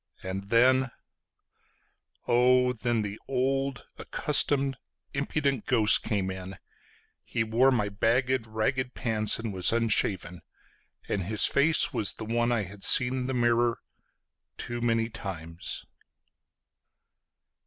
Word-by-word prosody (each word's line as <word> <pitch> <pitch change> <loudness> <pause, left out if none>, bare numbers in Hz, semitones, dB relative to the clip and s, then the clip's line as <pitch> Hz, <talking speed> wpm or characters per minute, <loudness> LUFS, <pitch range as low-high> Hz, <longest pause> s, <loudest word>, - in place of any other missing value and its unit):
And 95 +1 -6
then 130 +3 +3 1.4
…Oh, 125 +1 +3
then 120 -2 -1
the 105 +1 -6
old 135 0 -2
accustomed, 135 -2 +1 0.4
impudent 140 -2 -2
ghost 110 -5 +5
came 100 -4 -2
in:He 95 +4 -8
wore 120 +4 +2
my 110 -5 0
bagged, 120 +4 0
ragged 125 +4 -2
pants, 110 -3 0
and 115 -3 -5
was 90 -2 +1
unshaven; 100 -6 -1 0.7
And 95 -3 -2
his 105 +2 +4
face 150 +1 +2
was 110 -5 +1
the 110 - -8
one 120 +2 0
I 115 -3 0
had 100 +1 -10
seen 125 0 +7
in 130 -1 -3
the 130 - -2
mirrorToo 120 0 -4
many 115 -1 +1
times. 85 -7 -7
115 Hz, 110 wpm, -27 LUFS, 105-130 Hz, 1.4 s, seen